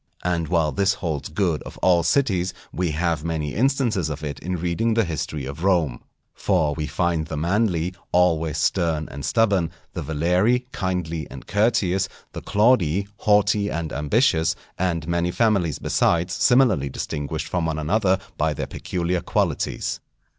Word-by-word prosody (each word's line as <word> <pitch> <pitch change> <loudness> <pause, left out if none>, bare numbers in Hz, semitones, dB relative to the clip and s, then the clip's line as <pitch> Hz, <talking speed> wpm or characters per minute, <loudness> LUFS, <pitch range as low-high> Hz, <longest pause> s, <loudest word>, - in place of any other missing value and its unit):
And 85 -2 0
while 80 -2 +1
this 100 +8 +1
holds 80 -6 -3
good 80 -1 0
of - - -10
all 90 -2 +4
cities, 90 -2 +1 0.2
we 90 -1 0
have 80 0 -1
many 80 -3 -2
instances 120 - +1
of 75 0 -5
it 75 -2 -4
in 90 +1 -3
reading 90 +7 0
the 115 - +3
history 80 -3 -4
of 70 +5 -7
Rome. 85 -10 +1 0.3
For 85 -7 +1
we 75 0 -3
find 85 +1 0
the 80 - -5
Manlii 90 0 0 0.2
always 80 -4 +2
stern 80 -1 0
and 70 0 -7
stubborn; 100 -7 +2 0.2
the - - -4
Valerii 90 +11 +1
kindly 85 -5 -2
and - - -10
courteous; 100 -3 +1 0.2
the - - -6
Claudii 100 -4 +2
haughty 105 0 +3
and 80 -3 -3
ambitious; 80 - +2 0.2
and 85 -4 -1
many 85 0 0
families 95 - +1
besides 85 +1 +1
similarly 115 - +3
distinguished 75 +3 -4
from 85 -1 -1
one 80 -1 -2
another 95 +5 +2 0.2
by 75 0 +1
their - - -3
peculiar 90 0 -2
qualities. - - -1
85 Hz, 155 wpm, -23 LUFS, 80-100 Hz, 0.3 s, all